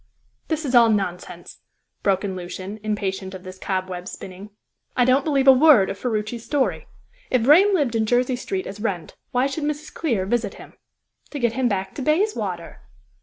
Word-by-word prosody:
"This 315 -1 -2
is 265 - -2
all 235 -2 +7
nonsense!" 195 -4 -3 0.4
broke 195 -1 +1
in 190 -2 -3
Lucian, 185 +3 -7
impatient 195 -3 -3
of 185 - -10
this 185 0 -10
cobweb 185 -2 -3
spinning. 190 +2 -9 0.5
"I 245 - +4
don't 260 +2 +3
believe 275 -3 +1
a - - +12
word 260 -7 +6
of 195 - -8
Ferruci's 225 -1 -3
story. 280 -1 -1 0.4
If 255 -3 +2
Vrain 340 - +6
lived 285 -9 +1
in 220 -1 0
Jersey 250 +2 +2
Street 195 -6 -4
as 200 +2 -8
Wrent, 195 -7 -3
why 250 +1 +1
should 280 +3 -3
Mrs. 300 +1 -4
Clear 230 - -1
visit 215 -1 -1
him?" - - -13 0.6
"To 295 - -6
get 235 -4 +1
him 255 0 +1
back 195 -3 -2
to - - -6
Bayswater." 255 - -1
225 Hz, 180 wpm, -23 LUFS, 190-270 Hz, 0.6 s, a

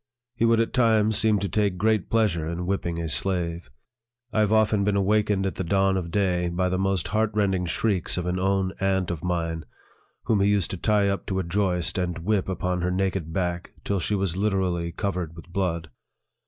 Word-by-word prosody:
He 115 -1 +1
would 115 0 +4
at 115 - 0
times 110 -3 +3
seem 110 -1 +3
to 100 - -2
take 100 0 0
great 110 0 +1
pleasure 100 -9 +1
in 85 +2 -3
whipping 85 -3 -2
a 85 - -2
slave. 85 0 -1 0.6
I 110 - +1
have 105 -1 +3
often 110 -2 +3
been 100 0 +1
awakened 100 0 +2
at 95 - -1
the - - -1
dawn 95 +2 +2
of 90 -3 -2
day 90 -2 +1
by 90 +2 0
the 95 0 -1
most 95 -2 0
heart 110 +1 +1
rending 95 -4 +1
shrieks 95 0 0
of 90 - -2
an 90 +1 -1
own 95 0 +1
aunt 95 -2 +1
of 85 -3 -5
mine, 85 -2 -2 0.6
whom 105 -3 +2
he 100 - +3
used 100 -5 +1
to 95 - -4
tie 105 +2 +2
up 100 0 -2
to 95 - -1
a 95 - 0
joist, 90 0 0
and 90 -2 -2
whip 95 +3 0
upon 90 0 -1
her 90 - 0
naked 95 -3 -1
back 85 0 -2
till 100 -1 -1
she 105 +4 -1
was 95 -3 -1
literally 95 -4 0
covered 90 -3 -3
with 85 - -12
blood. 85 -3 -2
95 Hz, 210 wpm, -25 LUFS, 90-105 Hz, 0.6 s, would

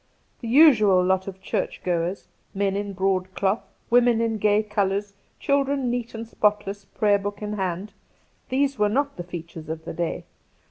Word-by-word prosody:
The 235 - -6
usual 225 - +6
lot 190 +1 +1
of 190 -1 -8
church - - -3
goers: 175 +2 -1 0.3
men 195 0 0
in 200 0 -3
broadcloth, 190 +1 0 0.3
women 240 -1 +5
in 225 -1 0
gay 210 +1 +3
colours, 200 -1 -1 0.3
childrerii 275 -2 +1
heat 240 -1 -4
and 225 0 -6
spotless, 205 -2 -1
Praygr 205 -2 +3
book 205 +1 -5
in 210 0 -3
hand 190 0 -3 0.3
— - - -39
these 270 0 0
were 210 0 +3
not 280 +5 0
the 175 - -4
features 165 -2 -8
of 160 0 -5
the - - -5
day. 170 0 -3
205 Hz, 170 wpm, -24 LUFS, 190-230 Hz, 0.3 s, usual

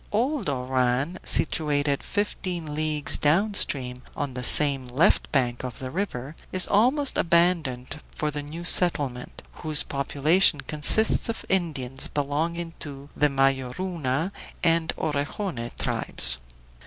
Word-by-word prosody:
Old 240 - -1
Oran, 130 +4 -1
situated 145 -3 +2
fifteen 180 -6 -3
leagues 155 -1 -1
down 190 +9 +2
stream 125 -9 0 0.2
on 145 -3 -3
the 125 - -5
same 135 0 +4
left 145 +11 +2
bank 125 -4 0
of 125 -2 -6
the 130 -1 -7
river, 155 -6 -4 0.2
is 185 -1 +2
almost 255 +7 +2
abandoned 165 -6 +1
for 150 0 -3
the 145 0 -4
new 160 +4 -8
settlement, 145 -9 +1 0.2
whose 155 -2 +4
population 145 +3 +1
consists 155 +13 +2
of 230 - -5
Indians 140 -8 0
belonging 165 +4 -3
to 140 -2 -9
the 150 - +2
Mayoruna 135 +4 -1 0.3
and 165 -1 +2
Orejone 145 - -3
tribes. 65 -1 +1
150 Hz, 120 wpm, -25 LUFS, 135-175 Hz, 0.3 s, same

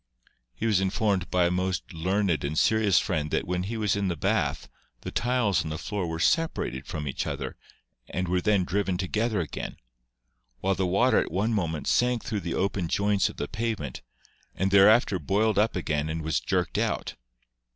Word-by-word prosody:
He 115 - -4
was 105 -4 +3
informed 95 -1 0
by 90 -1 +3
a 85 - +2
most 90 +1 -2
learned 90 +1 0
and 75 +2 -2
serious 110 0 +3
friend 80 -6 0
that - - 0
when 90 0 -1
he 110 +5 -4
was 105 -3 +1
in 100 -1 0
the 90 - -1
bath 75 - 0 0.3
the - - -6
tiles 120 -6 +1
on 80 - -5
the 75 - -3
floor 100 0 -3
were 80 0 -3
separated 120 - 0
from 75 -2 -4
each 65 - -3
other - - -4 0.5
and 90 0 -2
were 90 +1 +1
then 105 -2 +2
driven 95 0 -1
to 95 0 -2
gether 110 0 0
again, 80 - -5 0.8
while 95 +1 +1
the 95 -1 0
water 110 +6 +3
at - - -2
one 105 +6 0
moment 80 -7 -1
sank 125 -1 +2
through 105 - -2
the 85 -3 -4
opened 95 -3 -1
joints 100 0 +2
of - - -11
the 75 - -3
pavement 110 - -3 0.5
and 95 +1 0
thereafter 100 0 +5
boiled 100 +6 +1
up 110 +1 +2
again 75 -4 -1
and 80 0 -3
was 80 0 0
jerked - - -1
out. - - -1
95 Hz, 195 wpm, -27 LUFS, 85-105 Hz, 0.8 s, thereafter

